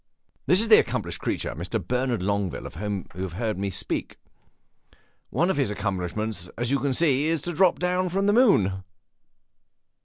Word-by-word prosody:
"This 180 - +5
is 230 - 0
the 215 - +9
accomplished - - -2
creature, - - -2
Mr. 90 +7 -3
Bernard 125 +1 -1
Longueville, 100 -2 -1
of - - -8
whom 100 +2 -4
you 90 - -7
have 95 -3 -4
heard 105 +1 -2
me 100 0 -1
speak. 95 - -3 1.1
One 175 +3 +1
of - - -2
his 135 -7 +1
accomplishments, 100 -1 -3
as 120 +2 -1
you 140 0 +1
see, 145 0 +2
is 165 0 +1
to 175 - -3
drop 180 +2 +4
down 180 +1 0
from 195 +3 0
the 205 - +3
moon." 105 - +4
120 Hz, 175 wpm, -25 LUFS, -, 1.1 s, the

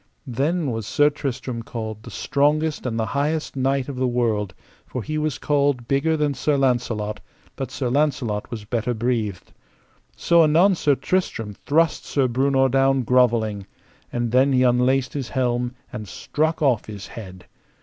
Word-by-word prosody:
Then 145 +4 -1
was 110 -3 -4
Sir 145 0 +3
Tristram 130 -4 -4
called 110 -2 -6
the - - -10
strongest 150 0 0
and 115 -2 -2
the 110 - +1
highest 150 +5 -1
knight 135 0 0
of 140 -3 -6
the 130 0 +1
world; 110 -6 0 0.3
for 125 - -5
he 155 +5 -2
was 150 -3 -1
called 140 -5 +1
bigger 155 +4 +1
than 150 -1 +1
Sir 145 +1 0
Launcelot, 120 -5 0 0.4
but 135 - -4
Sir 130 - -3
Launcelot 125 -6 0
was 110 -4 -6
better 120 +2 -1
breathed. 110 -5 -2 0.6
So 170 -1 +4
anon 165 +6 +5
Sir 150 -5 +2
Tristram 120 - -2
thrust 160 +9 +1
Sir 135 -3 +1
Breunor 135 +2 +2
down 135 0 +3
grovelling, 115 -5 +2 0.4
and 120 -1 -1
then 130 +2 +4
he 130 0 +4
unlaced 125 +1 +2
his 140 -4 -4
helm 125 -1 -1 0.2
and 105 -1 -6
struck 155 - -1
off 125 -6 +2
his 105 -2 -7
head. 95 -5 -10
130 Hz, 160 wpm, -23 LUFS, 115-145 Hz, 0.6 s, anon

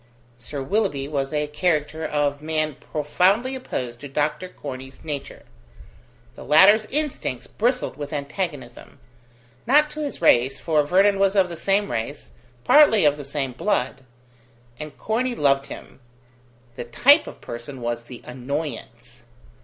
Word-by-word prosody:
Sir 135 +4 -6
Willoughby 185 -6 -1
was 140 -2 -2
a 150 -1 0
character 155 0 -1
of 145 -2 -1
man 155 -1 -1
profoundly 180 - 0
opposed 125 - -5
to 145 - -8
Dr. 150 +6 -2
Corney's 130 -4 -9
nature; 140 -3 -6 0.9
the - - -11
latter's 200 +8 +6
instincts 270 - -3
bristled 250 +3 -1
with 145 -1 -6
antagonism 145 -4 -5 0.7
not 300 +4 +4
to 305 - -8
his 290 -2 -4
race, 135 -4 +3
for 155 -3 +2
Vernon 195 +6 +3
was 195 0 +2
of 190 -2 +3
the 170 - -5
same 195 +4 0
race, 115 +5 -5 0.3
partly 225 - +6
of 145 -1 +4
the 145 - -8
same 140 -1 -3
blood, 135 - -1 0.8
and 150 -1 -8
Corney 240 +3 -1
loved 140 -4 +2
him: - - -11 0.8
the - - -4
type 280 - +4
of - - -10
person 120 +3 -8
was 120 0 -3
the 125 0 -11
annoyance. 140 +5 -6
150 Hz, 140 wpm, -23 LUFS, 135-195 Hz, 0.9 s, latter's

